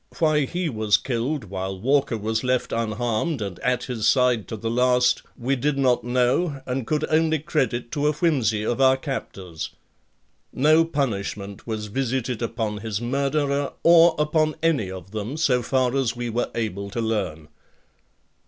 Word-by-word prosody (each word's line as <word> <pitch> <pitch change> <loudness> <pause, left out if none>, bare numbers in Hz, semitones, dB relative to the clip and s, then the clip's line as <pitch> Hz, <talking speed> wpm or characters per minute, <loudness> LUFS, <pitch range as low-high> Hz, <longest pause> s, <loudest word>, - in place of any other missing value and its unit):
Why 155 -3 +3
he 175 +5 -2
was 110 -6 +2
killed 130 +3 -2
while 95 -1 -5
Walker 135 +1 +1
was 110 +1 -2
left 125 0 0
unharmed 115 +6 -1
and 100 -5 -5
at 125 0 0
his 115 -4 -2
side 125 -5 +3
to 110 - -5
the 115 - -5
last 125 0 +3 0.2
we 130 +3 0
did 140 +2 0
not 130 -4 +2
know 125 +5 +1
and 125 -1 -3
could 155 0 0
only 160 0 +3
credit 135 -6 -1
to 150 -1 0
a - - +4
whimsy 130 - +1
of 120 +4 -1
our 130 0 +5
captors. 95 - -5 0.8
No 155 +5 +4
punishment 100 -9 -3
was 110 -2 -3
visited 125 +1 -2
upon 110 -2 -2
his 105 -1 -3
murderer 140 +3 0
or 170 -1 +7
upon 155 0 +1
any 145 - +2
of 95 0 -9
them 110 +7 -4
so 130 -6 +2
far 130 +1 +1
as 130 -4 0
we 120 -1 -3
were 120 +2 -1
able 100 -3 -3
to 110 - -4
learn. 95 -9 -2
125 Hz, 160 wpm, -24 LUFS, 110-145 Hz, 0.8 s, or